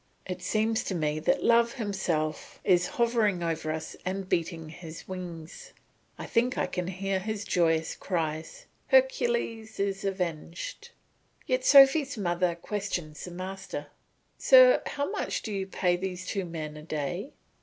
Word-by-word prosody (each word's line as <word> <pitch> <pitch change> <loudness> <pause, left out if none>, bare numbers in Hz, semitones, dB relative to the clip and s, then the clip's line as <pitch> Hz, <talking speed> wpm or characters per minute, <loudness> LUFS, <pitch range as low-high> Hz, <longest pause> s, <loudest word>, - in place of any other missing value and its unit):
It 180 -1 -5
seems 220 +4 +1
to 190 - -2
me 155 -2 0
that 155 - +1
Love 235 0 +4
himself 190 - -2
is 180 -2 +4
hovering 225 -6 +2
over 160 -2 -1
us 160 0 -5
and 190 +1 -3
beating 165 -2 -1
his 165 0 -10
wings; 175 -4 -8 0.4
I - - -6
think 245 +2 +1
I - - +2
can 180 -2 -3
hear 190 +1 -1
his 210 +1 -3
joyous 165 -2 +1
cries, 165 - -3 0.2
"Hercules 475 - +1
is 195 -1 -1
avenged." 175 -4 -4 0.6
Yet 255 -3 0
Sophy's 275 0 +7
mother 175 -2 0
questions 175 -5 -4
the - - -7
master. 185 +2 -6 0.5
"Sir, - - +7
how 285 0 -2
much - - -2
do 215 - -4
you 195 -1 -2
pay 180 -2 +1
these 185 0 -4
two 195 -1 -2
men 155 -3 -6
a - - -9
day?" 155 - -4
185 Hz, 145 wpm, -28 LUFS, 170-220 Hz, 0.6 s, Sophy's